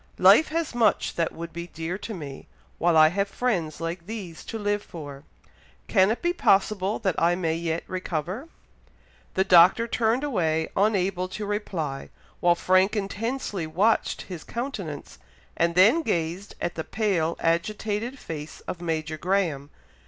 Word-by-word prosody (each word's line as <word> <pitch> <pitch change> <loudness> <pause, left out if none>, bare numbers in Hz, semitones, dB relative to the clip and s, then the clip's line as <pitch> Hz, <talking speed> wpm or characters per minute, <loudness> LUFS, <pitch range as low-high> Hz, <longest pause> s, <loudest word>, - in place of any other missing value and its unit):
Life 200 +12 +7
has 330 -2 -2
much 230 -4 +2
that 165 -1 0
would 170 0 -8
be 170 +1 -6
dear 165 +1 -4
to 220 - -6
me, 140 -5 -8 0.3
while 170 0 +3
I 155 0 +8
have 200 +4 0
friends 190 -9 -1
like 170 +1 -5
these 200 -7 -7
to 225 - -5
live 205 -1 0
for. 145 -7 -9 0.7
Can 190 -2 +4
it 225 - -2
be 345 0 +2
possible 200 - +2
that 190 -3 0
I 170 +1 +4
may 165 -3 0
yet 165 0 -2
recover?" 185 - -4 0.9
The 190 - +3
Doctor 185 +5 +6
turned 230 +3 +1
away, 160 - 0
unable 190 -3 +1
to 205 +3 -5
reply, 175 -9 -3 0.3
while 175 0 +4
Frank 185 +4 +3
intensely 205 -2 -3
watched 205 +8 +1
his 175 -4 -8
countenance, 195 - -6 0.4
and 170 0 +1
then 215 - +6
gazed 180 - -2
at 175 - -2
the 160 - -4
pale 180 -7 0
agitated 210 +8 -1
face 155 - -7
of 175 - -6
Major 160 -2 -3
Graham. 170 -7 0
185 Hz, 150 wpm, -26 LUFS, 165-210 Hz, 0.9 s, I